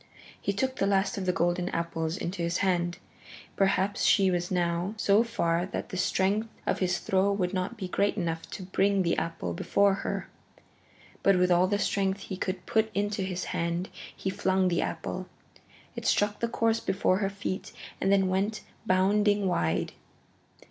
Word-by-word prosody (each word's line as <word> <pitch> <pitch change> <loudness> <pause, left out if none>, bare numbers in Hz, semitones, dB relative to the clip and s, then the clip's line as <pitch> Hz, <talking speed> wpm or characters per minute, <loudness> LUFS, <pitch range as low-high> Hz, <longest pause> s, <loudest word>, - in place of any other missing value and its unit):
He - - 0
took 260 +6 -1
the 195 - +1
last 195 0 +1
of 185 - -4
the - - +4
golden 175 +1 0
apples 165 0 -2
into 180 -2 -4
his 170 +1 0
hand. 175 -2 +1 0.6
Perhaps 195 0 +1
she 195 -2 +4
was 175 0 -1
now 175 +2 0
so 210 +1 +4
far 170 -6 0
that - - -5
the - - -6
strength 195 +4 +1 0.2
of - - 0
his 180 -2 +1
throw 190 +1 +1
would 190 -2 -1
not 190 +5 -2
be 190 -3 -4
great 200 +3 0
enough 165 -3 -3
to 190 - -7
bring 195 +1 +2
the 170 - +1
apple 165 - -3
before 200 - +2
her. - - -3 0.9
But 195 -1 +4
with 180 0 +3
all 175 +1 +5
the 205 +1 +1
strength 195 -1 0
he 190 - -5
could 185 -1 -3
put 220 0 +2
into 205 0 0
his 185 -1 -2
hand 170 +2 -1 0.3
he 190 - -3
flung 190 -1 +1
the 170 - +1
apple. - - -4 0.7
It - - -4
struck 205 0 +2
the 235 - 0
course 230 -1 +1
before 190 -1 +1
her 195 -2 0
feet 195 -1 -4 0.3
and 195 - +2
then 195 -1 +4
went 200 +4 0 0.3
bounding 205 +2 +3
wide. 85 - 0
190 Hz, 175 wpm, -28 LUFS, 180-200 Hz, 0.9 s, all